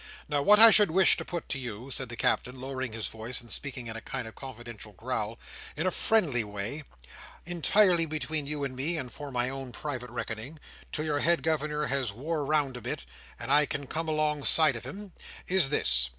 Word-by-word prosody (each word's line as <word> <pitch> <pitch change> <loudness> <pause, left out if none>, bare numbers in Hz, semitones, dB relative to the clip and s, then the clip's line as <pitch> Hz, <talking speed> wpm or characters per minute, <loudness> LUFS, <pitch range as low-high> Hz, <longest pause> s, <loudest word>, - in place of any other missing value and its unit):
Now 145 -1 0
what 210 +8 +6
I 225 0 +11
should 210 -1 +7
wish 185 +3 +5
to - - -4
put 170 -2 -5
to 135 - -2
you," 125 +1 -7
said 130 -1 -3
the 120 - -5
Captain, 125 +2 0
lowering 130 -1 -4
his 110 -1 -2
voice, 115 +2 -1
and 120 - -10
speaking 130 -4 -5
in 115 -1 -6
a 115 - -5
kind 125 -1 -5
of 110 - -10
confidential 120 -5 -9
growl, 115 +1 -3 0.4
"in - - -1
a 185 - +2
friendly 165 - +2
way, 105 +8 -4 0.6
entirely 175 +1 +3
between 155 -1 -2
you 150 -1 -3
and 135 -2 -3
me, 155 +6 0
and 130 -5 -5
for 145 -1 -7
my 125 -1 0
own 135 -1 -6
private 130 -3 -5
reckoning, 120 +5 -6 0.3
"till 155 - -3
your 145 -2 0
head 170 +3 +2
Governor 150 -1 0
has 130 -4 0
wore 150 +6 -3
round 140 -3 0
a - - -9
bit, 60 - -4 0.3
and - - -5
I 150 0 +5
can 140 0 -4
come 160 +4 -3
alongside 155 -1 +3
of 120 0 -6
him, 195 +7 -8 0.3
is 180 -6 +3
this. 65 - +3
140 Hz, 210 wpm, -28 LUFS, 120-155 Hz, 0.6 s, I